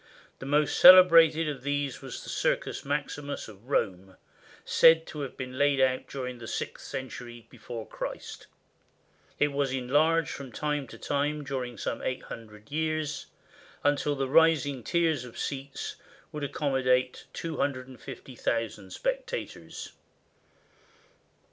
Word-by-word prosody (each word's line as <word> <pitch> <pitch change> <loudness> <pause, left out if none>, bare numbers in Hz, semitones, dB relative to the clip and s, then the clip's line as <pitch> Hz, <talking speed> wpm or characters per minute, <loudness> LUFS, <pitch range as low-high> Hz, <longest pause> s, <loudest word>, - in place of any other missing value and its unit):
The 135 - -7
most 150 +1 +2
cele 185 0 +12
brated 165 -2 +5
of 140 -4 -4
these 145 -1 -2
was 135 - -7
the - - -9
Circus - - -1
Maximus 145 -1 -3
of 110 +3 -14
Rome, 95 -7 -1 0.5
said 165 0 +6
to 150 - -8
have 135 - -6
been 130 0 -6
laid 145 -1 +3
out 130 -1 +2
during 125 -2 -5
the 115 - -8
sixth - - -5
century 120 -2 -7
before 115 -2 -7
Christ. - - -7 0.9
It 145 - +3
was 140 -1 0
enlarged 145 +5 +2
from 135 -3 -7
time 150 +2 -2
to - - -11
time 145 +1 -1
during 130 -4 -4
some - - -3
eight 130 - -3
hundred 105 0 -11
years, 155 -1 -2 0.6
until 145 0 +2
the 135 -1 -1
rising 145 -3 +3
tiers 160 -4 +1
of 125 -2 -11
seats 140 0 -4 0.3
would 150 -1 -5
accommodate 130 -3 +1
250,000 130 - -3
spectators. - - -4
140 Hz, 130 wpm, -28 LUFS, 125-150 Hz, 0.9 s, cele